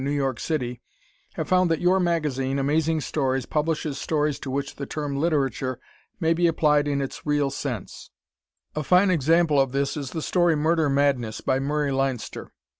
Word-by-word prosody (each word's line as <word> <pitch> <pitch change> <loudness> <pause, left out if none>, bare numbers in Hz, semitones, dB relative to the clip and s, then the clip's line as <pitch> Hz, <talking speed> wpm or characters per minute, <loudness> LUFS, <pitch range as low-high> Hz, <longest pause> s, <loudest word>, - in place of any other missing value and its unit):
New 140 - -1
York 135 -3 -1
City 125 -6 -3 0.5
have - - -3
found 185 -1 +3
that 165 -2 +1
your 180 +2 +3
magazine, 150 -7 0
Amazing 155 +3 +1
Stories, 135 -3 -1
publishes 155 -2 -1
stories 150 -2 0
to 135 - -6
which 140 +1 -3
the 140 - -5
term 145 -2 -3
"literature" 140 -4 0 0.4
may 165 -2 +2
be 170 +1 +2
applied 150 -2 +2
in 140 -1 0
its 135 - -7
real 145 -2 +1
sense. 125 -7 -5 0.7
A 155 - -1
fine 180 +6 +4
example 160 -2 +3
of 135 -1 -1
this 140 0 0
is 140 -4 -4
the 160 +1 -5
story 175 -3 +2
"Murder 155 0 +2
Madness," 135 -5 +1
by 130 - +1
Murray 145 +1 -1
Leinster. 135 -3 -2
145 Hz, 175 wpm, -25 LUFS, 135-160 Hz, 0.7 s, fine